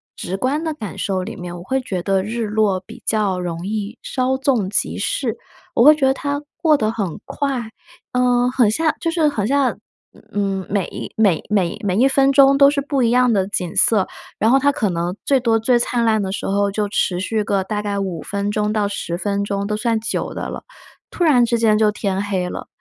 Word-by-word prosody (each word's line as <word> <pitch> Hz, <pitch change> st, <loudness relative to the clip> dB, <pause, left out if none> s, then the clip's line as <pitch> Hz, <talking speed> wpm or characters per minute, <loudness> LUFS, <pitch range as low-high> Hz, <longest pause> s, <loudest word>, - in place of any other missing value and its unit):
直 190 Hz, +2 st, -4 dB
观 275 Hz, +8 st, -1 dB
的 320 Hz, -2 st, -2 dB
感 210 Hz, -, -7 dB
受 190 Hz, -2 st, -1 dB
里 -, -, -7 dB
面， 175 Hz, -1 st, -7 dB
我 175 Hz, -, -8 dB
会 265 Hz, +7 st, -1 dB
觉 190 Hz, -8 st, -4 dB
得 190 Hz, +1 st, +1 dB
日 225 Hz, +2 st, -3 dB
落 210 Hz, -3 st, +1 dB
比 -, -, -12 dB
较 205 Hz, -4 st, 0 dB
容 175 Hz, -1 st, -4 dB
易， 215 Hz, +2 st, -4 dB
稍 260 Hz, 0 st, -1 dB
纵 255 Hz, -8 st, +1 dB
即 210 Hz, -, -1 dB
逝， -, -, -2 dB, 0.4 s
我 235 Hz, -, +5 dB
会 300 Hz, +3 st, +8 dB
觉 290 Hz, -3 st, +1 dB
得 265 Hz, -, +3 dB
它 285 Hz, +1 st, -3 dB, 0.2 s
过 315 Hz, -2 st, +4 dB
得 215 Hz, -5 st, 0 dB
很 200 Hz, -7 st, -4 dB
快， 265 Hz, -6 st, -3 dB, 0.4 s
呃， 250 Hz, 0 st, +2 dB
很 245 Hz, -4 st, +3 dB
像 315 Hz, +8 st, +1 dB
就 330 Hz, -, -1 dB
是 325 Hz, -2 st, +2 dB
很 215 Hz, -8 st, -1 dB
像， 275 Hz, -1 st, +1 dB, 0.5 s
嗯， 195 Hz, -2 st, -1 dB
每 195 Hz, -3 st, -3 dB
每 200 Hz, -7 st, +3 dB
每 190 Hz, -5 st, 0 dB
每 190 Hz, -3 st, 0 dB
一 260 Hz, -, +5 dB
分 270 Hz, 0 st, +3 dB
钟 275 Hz, 0 st, +5 dB
都 280 Hz, -, +8 dB
是 285 Hz, 0 st, 0 dB
不 280 Hz, -1 st, -1 dB
一 235 Hz, -, +3 dB
样 250 Hz, 0 st, +3 dB
的 195 Hz, -2 st, +1 dB
景 180 Hz, -4 st, -3 dB
色。 210 Hz, -4 st, +3 dB, 0.3 s
然 220 Hz, -, +2 dB
后 270 Hz, -, +5 dB
它 285 Hz, +1 st, +3 dB
可 225 Hz, -9 st, -1 dB
能 175 Hz, +1 st, -2 dB
最 275 Hz, -2 st, +3 dB
多 230 Hz, -2 st, +2 dB
最 240 Hz, +2 st, +2 dB
灿 235 Hz, 0 st, 0 dB
烂 220 Hz, -2 st, +2 dB
的 190 Hz, -, -3 dB
时 195 Hz, -, -4 dB
候 200 Hz, +1 st, +1 dB
就 205 Hz, +1 st, -1 dB
持 185 Hz, -3 st, 0 dB
续 215 Hz, +3 st, -1 dB
个 200 Hz, -1 st, 0 dB
大 210 Hz, +2 st, -3 dB
概 205 Hz, -1 st, -3 dB
5 185 Hz, -5 st, -3 dB
分 200 Hz, 0 st, -3 dB
钟 210 Hz, 0 st, 0 dB
到 210 Hz, -2 st, 0 dB
10 170 Hz, -4 st, -4 dB
分 200 Hz, +1 st, -1 dB
钟 200 Hz, 0 st, -2 dB
都 210 Hz, +1 st, -1 dB
算 225 Hz, +1 st, 0 dB
久 225 Hz, -, -3 dB
的 -, -, -4 dB
了， -, -, -7 dB, 0.5 s
突 350 Hz, -, -2 dB
然 275 Hz, -7 st, +5 dB
之 235 Hz, 0 st, +1 dB
间 225 Hz, -2 st, +3 dB
就 215 Hz, -1 st, +4 dB
天 195 Hz, -2 st, -2 dB
黑 190 Hz, -3 st, -1 dB
了， -, -, -6 dB
215 Hz, 235 characters per minute, -20 LUFS, 195-255 Hz, 0.5 s, 会